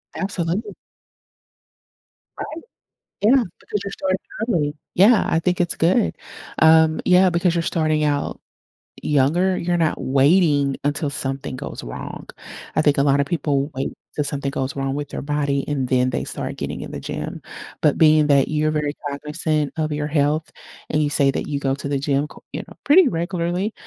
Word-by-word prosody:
Absolutely. 195 +2 -2 1.7
Right? 310 - -5 0.7
Yeah, 265 0 +5 0.2
because 210 - -3
you're 200 - -5
starting 190 -1 -1 0.3
early. 150 -9 0 0.2
Yeah, 210 +4 +5
I - - +2
think 180 +2 0
it's 175 -1 +1
good. 165 - +2 0.5
Um, 160 0 +5
yeah, 185 +1 +5
because 170 0 +1
you're 170 - +1
starting 155 -2 +1
out 145 -1 -1 0.6
younger, 155 +7 +2
you're 175 0 0
not 160 -2 0
waiting 140 0 +3
until 145 +1 0
something 135 -1 -3
goes 130 - -7
wrong. - - -7 0.5
I - - +3
think 145 -2 +3
a 140 - +3
lot 140 0 +3
of 140 - +1
people 145 -4 0
wait 135 - -3 0.2
till 150 - 0
something 140 -1 -2
goes 135 -1 -3
wrong 135 0 -2
with 145 -1 -4
their - - -5
body, 140 -1 -1
and 140 -3 -1
then 125 0 +2
they 125 - -2
start - - -5
getting - - -4
in - - -7
the - - -5
gym. - - -5 0.4
But 150 - +3
being 155 -1 +5
that 140 -2 +4
you're 155 0 0
very 150 -1 -1
cognizant 150 +1 -2
of 155 -1 -1
your 150 0 -2
health 150 +1 0 0.4
and 150 - +1
you 145 - 0
say 140 -2 +3
that - - -4
you 145 -1 -2
go 135 -1 0
to 140 - -6
the 140 -1 -1
gym, 140 +1 0
co - - -15
you - - -4
know, - - -13
pretty 320 +3 +6
regularly, 175 +2 -2
150 Hz, 180 wpm, -21 LUFS, 140-170 Hz, 1.7 s, pretty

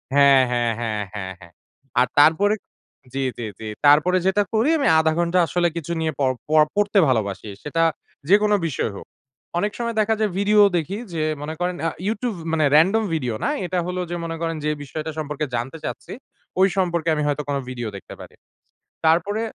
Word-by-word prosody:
হ্যাঁ, 140 -1 +7
হ্যাঁ, 120 -1 +1
হ্যাঁ, 110 -3 -2
হ্যাঁ, 95 -2 -5
হ্যাঁ। 85 -1 -15 0.5
আর 125 - +4
তারপরে 190 +8 +5 0.6
জি, 135 0 -1
জি, 120 - -4
জি। 110 - -6 0.2
তারপরে 155 +6 +5
যেটা 205 +2 +3
করি 225 +7 +2
আমি 285 - +1
০.৫ 160 0 +2
ঘন্টা 175 +1 +2
আসলে 175 -1 +1
কিছু 170 +1 -5
নিয়ে 160 -1 0
পড় 130 -2 +2
প - - -33 0.3
পড়তে 205 0 +3
ভালোবাসি। 105 -4 -1
সেটা 165 +3 0 0.5
যেকোনো 210 +1 +5
বিষয় 130 - -2
হোক। - - -9 0.5
অনেক 205 +3 0
সময় 235 -1 -3
দেখা 220 +1 +2
যায় 215 -3 +1
ভিডিও 210 +1 +4 0.2
দেখি 180 +6 -3 0.2
যে 155 -1 -1 0.2
মনে 155 +2 -4
করেন 180 0 -1
আ - - +1 0.2
YouTube 225 -2 -2
মানে 155 -2 +2
র‍্যান্ডম 195 +8 +4
ভিডিও 125 -8 -1
না। - - +1 0.2
এটা 180 0 -1
হলো 180 0 -2
যে 175 - -3
মনে 165 0 -4
করেন 165 -1 -1
যে 150 - +1
বিষয়টা 155 +3 -5
সম্পর্কে 150 0 -3
জানতে 125 +7 -4
চাচ্ছি, - - -6 0.5
ঐ - - +5 0.2
সম্পর্কে 170 -3 0
আমি 150 - -1
হয়তো 145 0 -1
কোনো 140 -1 0
ভিডিও 120 -3 -4
দেখতে 100 - -10
পারি। - - -12 0.7
তারপরে 175 +7 +2
160 Hz, 185 wpm, -22 LUFS, 140-195 Hz, 0.7 s, হ্যাঁ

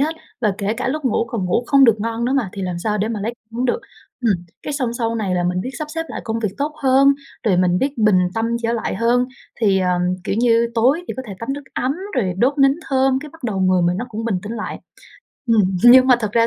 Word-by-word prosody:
hết, 310 +3 +1 0.3
và 210 -5 +1
kể 205 +1 -1
cả 250 - -2
lúc 300 +2 -3
ngủ, 240 -2 +1
còn 225 -5 -3
ngủ 180 +7 0
không 275 0 +5
được 220 -3 +4
ngon 230 +2 -2
nữa 255 - 0
mà, 260 -8 +1
thì 195 - -5
làm 180 -2 -3
sao 210 +3 -1
để 215 +3 0
mà 220 -3 -3
lấy 225 +4 -2 0.2
hứng 240 +2 -2
được. 355 - 0 0.5
Ừm, 215 - +5 0.3
cái 295 - -4
xong 255 -5 -1
sau 230 -1 -1
này 200 -5 -1
là 175 0 0
mình 180 +1 0
biết 255 - -4
sắp 305 -1 -5
xếp 325 +1 -3
lại - - -5
công 225 0 -2
việc 210 -4 -2
tốt 295 +2 -1
hơn, 275 +1 +5 0.3
rồi 195 -5 +2
mình 180 0 +2
biết 270 +1 -2
bình 210 -3 +4 0.2
tâm 225 0 0 0.2
trở 230 0 0
lại 230 - -2
hơn, 245 +2 +2 0.3
thì, 200 -3 +3
ờ, 180 -1 +1 0.3
kiểu 200 - -1
như, 230 -1 +3
tối 265 +10 +2
thì - - -3
có 260 - -4
thể 200 - -7
tắm 230 +4 -3
nước 285 +1 -6
ấm 255 +2 0 0.2
rồi 190 -8 +1
đốt 275 +6 +2
nến 275 0 +5
thơm, 265 -1 +2
cái 300 - -8
bắt 325 -6 -14
đầu 200 -5 -1
người 185 -1 +3
mình 175 +1 +1
nó 235 - -3
cũng 225 +1 -5
bình 205 -5 0
tĩnh 210 +2 -6
lại. 220 -2 -5 0.7
Ừm, 225 -3 +5 0.2
nhưng 255 +1 +8
mà 255 - +7
thật 210 -1 -2
ra 230 0 +4
230 Hz, 270 wpm, -20 LUFS, 205-260 Hz, 0.7 s, nhưng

